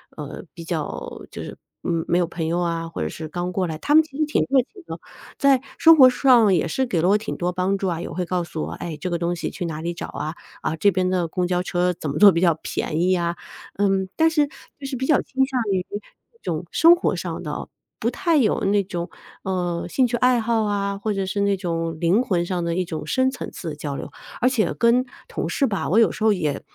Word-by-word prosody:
呃， 150 +3 -7
比 170 - -9
较 165 -3 -4 0.2
就 - - -7
是， - - -8 0.3
嗯， 165 -2 -1
没 175 - +2
有 175 - +2
朋 165 -1 -4
友 170 +2 0
啊， 165 -1 -1
或 165 - -6
者 75 - -1
是 160 - -7
刚 175 +3 -3
过 185 0 -1
来， 160 -1 -4
他 290 - 0
们 315 - +9
其 295 -3 -12
实 310 - +2
挺 300 - +1
会 270 0 +3
热 - - -11
情 390 -4 -13
的， - - -5 0.4
在 275 -3 +4 0.2
生 325 0 +8
活 260 -3 +9
上 245 -6 +5
也 165 - +1
是 265 +10 0
给 180 -10 0
了 175 - +3
我 205 - +5
挺 215 +1 -5
多 180 0 -1
帮 185 +2 0
助 195 - -2
啊， 170 -2 -2
也 - - -5
会 180 0 -3
告 180 0 -1
诉 160 -2 -5
我， - - -4
哎， 170 -3 -6
这 180 - -3
个 175 - 0
东 170 +1 -1
西 170 - -3
去 180 - -5
哪 160 -2 -4
里 170 +1 -3
找 170 - -6
啊， 155 +2 -5 0.3
啊， - - -1
这 180 +6 +3
边 185 0 0
的 180 -2 +1
公 180 +2 -1
交 180 0 0
车 180 0 0
怎 160 -3 -5
么 140 - -3
坐 205 -1 +9
比 170 - 0
较 170 -2 +5
便 155 - -2
宜 180 +1 +3
呀。 170 -2 0 0.4
嗯， 195 -1 +1
但 320 0 +4
是 300 -2 +2 0.3
就 280 - -8
是 270 - -4
比 260 - -2
较 295 -1 +3
倾 265 0 0
向 265 -1 -2
于 185 -1 0 0.5
这 460 - -30
种 - - -3
生 335 +1 +7
活 350 - 0
上 - - -4
的， - - -5 0.3
不 - - +1
太 335 -3 +1
有 245 -7 +2
那 200 +1 +3
种， 175 -2 -5 0.3
呃， 175 -3 -2
兴 260 - +2
趣 240 0 -1
爱 250 0 +3
好 225 0 +1
啊， 200 -1 -1
或 210 +1 -2
者 195 -1 -1
是 200 +2 -1
那 200 0 +2
种 165 -3 -2
灵 175 +7 +3
魂 180 -8 0
上 175 -1 -2
的 170 - -1
一 185 - +1
种 160 -2 -5
深 260 0 +2
层 250 - -6
次 170 - -6
的 150 - -5
交 145 -1 -5
流。 - - -6 0.3
而 250 - +4
且 245 -5 +1
跟 240 +2 +3 0.2
同 - - -3
事 280 - +1
吧， 200 -3 -2
我 200 - +2
有 230 - +5
时 - - -6
候 220 - +5
也 155 -7 -2
185 Hz, 280 characters per minute, -23 LUFS, 170-235 Hz, 0.5 s, 们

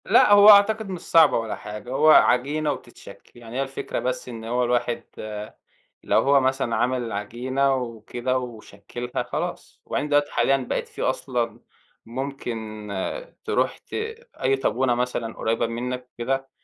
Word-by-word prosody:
لأ، 205 - +6
هو 205 +1 +9
أعتقد 210 +1 +6
مش 185 -3 -5
صعبة 160 -3 +5
ولا 115 -2 -3
حاجة، 105 +3 -8
هو 145 +4 +4
عجينة 145 +3 +4
وبتتشكِّل. 120 - -11
يعني 115 0 -10
هي 135 - +1
الفكرة 135 0 -4
بس 125 0 -3
إن 115 -2 -7
هو 120 +2 0
الواحد 120 -1 0 1.0
لو - - +3
هو 140 0 +4
مثلًا 130 -2 0
عمل 125 -2 0
عجينة 130 +7 0
وكده 120 +1 -3
وشكِّلها 120 0 -6
خلاص، - - -5
وبعدين 150 - -2
دلوقتي 145 0 +2
حاليًا 135 - +3
بقت 130 -2 -3
في - - -9
أصلًا 120 -3 -1 0.5
ممكن 115 -4 -5 0.6
تروح - - 0
ت - - -20 0.5
أي 135 +1 +3
طابونة 130 -2 +1
مثلًا 120 -2 -2
قريّبة 115 +1 0
منّك 125 +2 -4
وكده 135 +3 -2
125 Hz, 145 wpm, -24 LUFS, 115-135 Hz, 1.0 s, هو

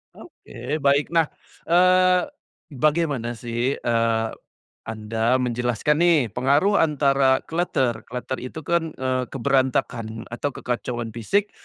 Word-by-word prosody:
Oke, 125 +6 -7
baik. 140 +1 +2
Nah, 165 -2 +3 0.4
eee, 180 +1 +5 0.5
bagaimana 145 -4 0
sih, 120 +3 -2
eee, 115 -1 0 0.6
anda 110 +2 -1
menjelaskan 125 +3 0
nih 170 -1 +5
pengaruh 145 - +2
antara 140 -3 +3
clutter, 135 -9 -1
clutter 125 +1 -5
itu 130 +5 -7
kan, 165 0 -1
eee, 130 -1 -1
keberantakan 125 -4 -1
atau 120 +4 -2
kekacauan 120 -1 -4
fisik 195 - -1
130 Hz, 110 wpm, -23 LUFS, 120-155 Hz, 0.6 s, eee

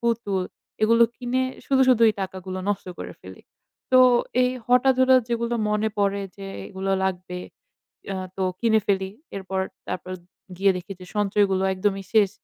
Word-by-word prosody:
পুতুল, 225 -5 0 0.4
এগুলো 230 +2 +5
কিনে 255 +1 -1 0.2
শুধু 265 -1 +4
শুধুই 230 -3 +5
টাকাগুলো 185 0 -5
নষ্ট 205 -2 -1
করে - - -7
ফেলি। 95 0 -12 0.5
তো 255 - +7 0.4
এই 250 - +3 0.2
হঠাৎ, 250 +2 +5
হঠাৎ 260 0 +6
যেগুলো 235 0 -1
মনে 210 +1 +1
পড়ে 200 0 +1
যে, 195 -1 -8 0.2
এগুলো 190 0 -4
লাগবে 180 -1 -3 0.7
অ্যা 195 - -3 0.2
তো 190 - 0 0.2
কিনে 220 -2 +3
ফেলি। 190 -1 +1 0.3
এরপর 190 -1 -3 0.3
তারপর 185 0 -5 0.5
গিয়ে 195 +1 +4
দেখি 180 +2 -9
যে, 185 - -10
সঞ্চয়গুলো 200 -2 +2
একদমই 195 +1 -1
শেষ। 210 -3 +5
200 Hz, 150 wpm, -24 LUFS, 190-235 Hz, 0.7 s, তো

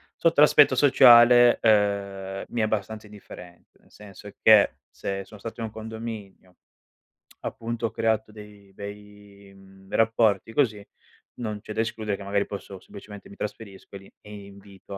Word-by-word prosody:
Sotto 165 -3 +2
l'aspetto 150 -2 +6
sociale, 120 -2 +6
ehm, 100 -3 0
mi 120 - -3
è - - +1
abbastanza 110 0 -3
indifferente, 95 -4 -15
nel - - -28
senso 105 0 -13
che 110 -2 +5
se 95 0 -6
so' 105 - -14
stato 115 +3 -9
in 115 - -3
un - - -12
condominio, 110 -4 -9 0.9
appunto, 115 0 -4
ho - - -10
creato 110 -1 -1
dei 105 -2 -15
bei 100 0 -12
mhmm, 95 0 -19
bei - - -3
rapporti, 115 -1 +1
così 110 -6 0 0.5
non 105 -4 -6
c'è - - -11
da 110 - -5
escludere 110 -2 -4
che 100 - -10
magari 100 +1 -1
posso 100 -1 -9
semplicemente 105 0 -13
mi 100 - -15
trasferisco 100 -2 -9
lì 95 - -17
e 105 -1 -11
invito 100 0 -13
105 Hz, 155 wpm, -24 LUFS, 100-110 Hz, 0.9 s, l'aspetto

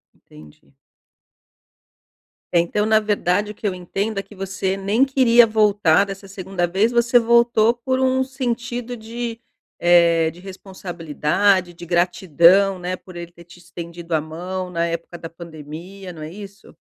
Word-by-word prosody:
Entendi. 75 0 -18 1.8
É, 170 - +5
então, 190 +5 0
na 215 0 +4
verdade, 205 -1 0
o - - -13
que 210 - -4
eu 185 - -2
entendo 195 +4 -4
é 195 - -2
que 210 - -16
você 190 0 -3
nem 205 +7 +1
queria 245 -3 +5
voltar 205 -5 +3
dessa 195 0 -8
segunda 190 -2 -3
vez. 195 +7 +1
Você 240 +1 +4
voltou 235 -1 +3
por 260 +2 -2
um 260 0 +2
sentido 245 -2 -4
de, 230 +1 -6 0.4
eh, 170 -2 +4
de 175 - -16
responsabilidade, 185 -1 -1
de 175 - -10
gratidão, 180 +2 +3
né, 180 +1 -3
por 185 -1 -15
ele 170 0 -8
ter 170 0 -16
te 175 +1 -17
estendido 170 -1 -6
a 155 - +1
mão 180 +4 -6
na 170 -1 -1
época 170 +1 -5
da 165 - -8
pandemia, 170 +3 -10
não 155 -2 -10
é 155 - -7
isso? 200 0 -12
190 Hz, 155 wpm, -21 LUFS, 170-220 Hz, 1.8 s, É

